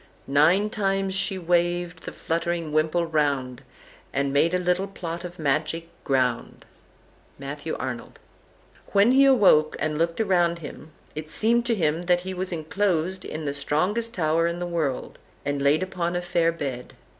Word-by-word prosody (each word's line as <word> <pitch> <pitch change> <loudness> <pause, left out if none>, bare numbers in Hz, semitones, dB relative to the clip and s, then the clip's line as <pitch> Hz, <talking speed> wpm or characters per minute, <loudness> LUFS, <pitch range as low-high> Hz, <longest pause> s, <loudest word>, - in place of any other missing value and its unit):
Nine 165 +10 +3
times 195 -2 0
she 195 0 -1
waved 175 -1 0
the - - -5
fluttering 170 -1 -2
wimple 155 +2 +2
round, 140 -6 0 0.5
And 140 0 -1
made 165 +5 +3
a - - +4
little 180 +2 0
plot 170 -3 -6
of 175 0 -8
magic 155 +3 -1
ground." 130 -4 -1 0.7
Matthew 145 +3 -5
Arnold. 125 -2 -6 0.7
And - - -20
when 200 +4 +6
he 270 +1 +6
awoke, 195 - +5
and 155 -1 -2
looked 165 +2 0
round 175 -5 +2
him, 155 -1 -9 0.2
it 155 0 -6
seemed 235 +6 +2
to 235 - +2
him 160 -3 0
that 175 0 +2
he 190 +1 -5
was 185 +1 -4
enclosed 180 +2 -1
in 155 0 -5
the 140 - -1
strongest 200 +12 -1
tower 165 0 +2
in 170 0 -2
the 175 - -3
world, 160 -7 -3 0.3
and 145 -1 -1
laid 145 +5 +3
upon 180 -2 -2
a 175 - 0
fair 170 -1 +2
bed. 135 -7 -5
170 Hz, 165 wpm, -25 LUFS, 150-185 Hz, 0.7 s, when